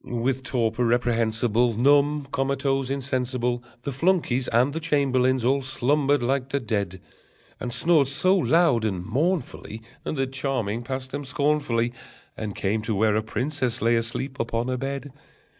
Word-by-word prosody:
_] 120 -1 -3
With 130 +1 0
torpor 120 -2 0
reprehensible, 115 -1 +1
Numb, 145 +2 +3
comatose, 135 0 0
insensible, 125 -3 -1 0.2
The 140 - -3
flunkeys 135 -4 +1
and 125 +5 +2
the 160 - -2
chamberlains 130 -5 +1
all 135 +2 +3
slumbered 140 +1 +1
like 135 +1 0
the 140 - 0
dead, 100 -6 -2 0.6
And 125 - -4
snored 155 +1 +3
so 185 +7 +3
loud 165 - +3
and 95 -5 -2
mournfully, 135 - -2 0.2
That 135 -3 -2
Charming 125 -5 -1
passed 130 +1 -5
them 145 +1 -4
scornfully 130 -4 0 0.4
And 105 -2 -5
came 105 +3 -1
to 110 0 -2
where 105 +1 +2
a 110 - +2
princess 125 +2 -2
lay 115 +1 +3
asleep 115 +4 -3
upon 115 +2 -1
a 130 - -1
bed. 140 +1 -4
130 Hz, 150 wpm, -25 LUFS, 115-140 Hz, 0.6 s, Numb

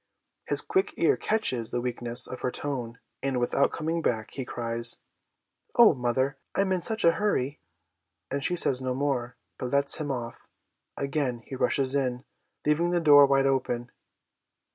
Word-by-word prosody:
His - - +5
quick 380 0 -1
ear - - +3
catches 130 - 0
the 120 - -2
weakness 120 0 +2
of 130 - -5
her - - -1
tone, 125 -4 -4 0.2
and, 135 -2 -1
without 120 +3 +1
coming 165 +1 -2
back, 110 -7 -2
he 135 - -5
cries, 115 -1 +2 0.4
* - - -41
Oh, 235 -7 +7
mother, 130 +2 -1 0.2
I'm 195 -1 +1
in 185 -1 0
sucli 220 -3 +2
a - - +4
hurry,' 150 -8 -1 0.7
and 140 0 -2
she 180 - +2
says 135 -6 +2
no 130 -1 -2
more, 130 -3 -2 0.2
but 125 - -4
lets 140 +1 +2
him 150 -2 -4
off. 120 -3 -6 0.5
Again 140 -4 -2
he 135 - -7
rushes 130 +1 +2
in, 130 -2 -2 0.4
leaving 155 +3 +2
the 175 0 +1
door 145 -3 +7
wide 135 0 +2
open. 125 -3 -1
135 Hz, 165 wpm, -27 LUFS, 125-150 Hz, 0.7 s, Oh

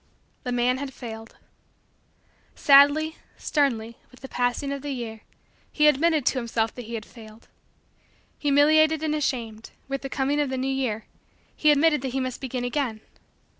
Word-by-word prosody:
The 250 - -4
man 245 +1 +1
had 270 -2 -6
failed. 225 -2 -9 1.2
Sadly, 290 +3 +5 0.2
sternly, 235 -6 -1
with 255 - -19
the 270 - -8
passing 250 +3 -1
of 280 -1 -4
the 290 - -6
year, 235 -5 -5 0.5
he 300 - +2
admitted 300 0 +3
to 260 - +2
himself 225 -2 -1
that 245 - -8
he 230 +1 -6
had 215 -2 -6
failed. 220 -1 -15 0.9
Humiliated 310 +2 +4
and 310 -1 0
ashamed, 235 -7 -3 0.2
with 275 0 -3
the 270 - -6
coming 275 +2 0
of 290 - -1
the 260 - -3
new 260 +1 -2
year, 235 -5 -2 0.5
he 305 - +3
admitted 300 0 +4
that 260 -2 -4
he 270 - 0
must 255 -1 -4
begin 255 -2 -4
again. 245 -4 -2
265 Hz, 165 wpm, -25 LUFS, 235-290 Hz, 1.2 s, Sadly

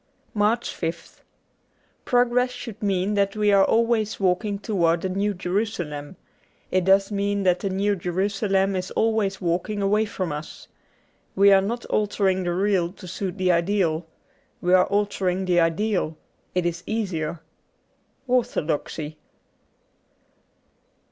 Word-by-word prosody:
70 210 - -7
MARCH 220 +3 +2
5th 165 0 -5 0.8
PROGRESS 245 0 +3
should 235 -4 -8
mean 195 0 0
that 200 0 +1
we 210 -1 +2
are 195 -1 +6
always 225 0 +1
walking 200 +2 +1
towards 175 -5 +1
the 190 - -1
New 200 +3 0
Jerusalem. 180 -5 -3 0.6
It 185 -1 +1
does 195 +1 +4
mean 200 0 0
that 180 -1 +3
the 195 - -2
New 200 +2 +1
Jerusalem 195 +2 0
is 185 0 -3
always 220 -3 0
walking 180 +4 -1
away 210 +2 +2
from 185 -5 -4
us. 150 +1 -7 0.7
We 200 +1 +6
are 195 - +6
not 235 +5 -3
altering 195 -3 0
the 175 - 0
real 190 -3 +1
to 185 - -12
suit 185 +1 -4
the 185 -1 +2
ideal. 170 -2 +1 0.5
We 180 +1 +1
are 185 0 +6
altering 190 -2 0
the 180 -1 +3
ideal: 165 -1 0 0.4
it 180 -1 +1
is 170 0 -2
easier. 175 -8 -2 0.9
'Orthodoxy.'' 155 - -1
195 Hz, 135 wpm, -24 LUFS, 175-205 Hz, 0.9 s, are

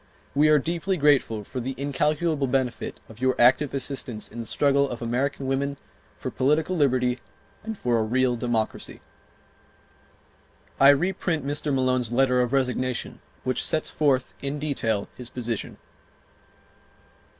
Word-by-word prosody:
We 150 +2 +4
are 155 - +6
deeply 170 +6 -1
grateful 140 -8 +3
for 130 +5 -6
the 130 +2 -4
incalculable 150 +2 0
benefit 130 -2 -2
of 110 +2 -14
your 130 0 +1
active 130 +4 +5
assistance 130 -4 -2
in 120 - -9
the 115 - -4
struggle 140 -1 +2
of 120 - -5
American 130 +4 -1
women 140 +1 -1 0.4
for - - -5
political 150 +7 +1
liberty 125 -5 +2 0.4
and 220 -1 -5
for 120 -7 +1
a - - +2
real 125 +2 +1
Democracy." 115 -2 -2 1.8
I 135 - +8
reprint 160 0 +1
Mr. 145 +1 -1
Malone's 130 -3 +1
letter 125 0 +3
of 125 -1 0
resignation 130 -2 -1 0.2
which 130 0 -1
sets 155 - 0
forth 135 -4 +1
in 140 +1 -3
detail 115 -8 -1
his 125 -2 -7
position. 120 -4 -4
135 Hz, 140 wpm, -25 LUFS, 125-145 Hz, 1.8 s, I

